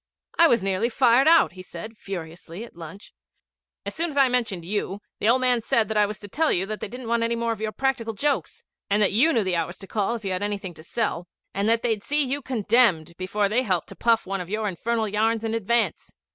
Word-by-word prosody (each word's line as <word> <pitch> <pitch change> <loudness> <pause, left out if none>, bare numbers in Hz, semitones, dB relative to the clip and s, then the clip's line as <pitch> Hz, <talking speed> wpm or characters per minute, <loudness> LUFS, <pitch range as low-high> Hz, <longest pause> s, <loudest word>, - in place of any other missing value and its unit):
'I 335 - +8
was 235 -9 +2
nearly 195 +4 +1
fired 250 +3 +4
out,' 325 - +6
he 185 +1 -11
said 185 +5 -9
furiously 175 -1 -7
at 235 - -12
lunch. 170 +4 -11 0.7
'As - - -4
soon 335 +1 -2
as 285 - -7
I 270 -2 +5
mentioned 225 -9 -1
you, 205 +1 -2 0.2
the 215 - +2
old 255 +2 +4
man 250 -2 +2
said 220 -1 +1
that 220 - -2
I 210 -1 +4
was 210 0 -6
to 205 - -8
tell 315 +10 +1
you 185 - +1
that 215 +1 -5
they - - -4
didn't 245 +3 -8
want 235 0 +1
any 230 0 +1
more 230 0 -1
of 220 -2 -5
your 215 0 -1
practical 235 -3 -1
jokes, 290 +6 -1 0.3
and 205 +1 +2
that 195 - +2
you 255 +11 +4
knew 230 -7 +2
the 185 -2 0
hours 175 +1 -2
to - - -10
call 205 +3 -1
if 220 -3 -8
you 195 - -1
had 185 +1 -2
anything 200 -3 -3
to 155 - -13
sell, 180 -3 -2 0.3
and 200 +2 0
that 230 0 +2
they'd 225 -4 0
see 295 +1 +1
you 275 +2 -2
condemned 215 - +2
before 200 +2 0
they 225 +5 +1
helped 185 -9 -1
to - - -10
puff 230 -1 +2
one 195 0 -3
of 175 - -8
your 215 +1 -1
infernal 220 +4 -1
yarns 220 +2 +1
in 225 0 -2
advance. 230 +1 0
220 Hz, 250 wpm, -25 LUFS, 195-235 Hz, 0.7 s, I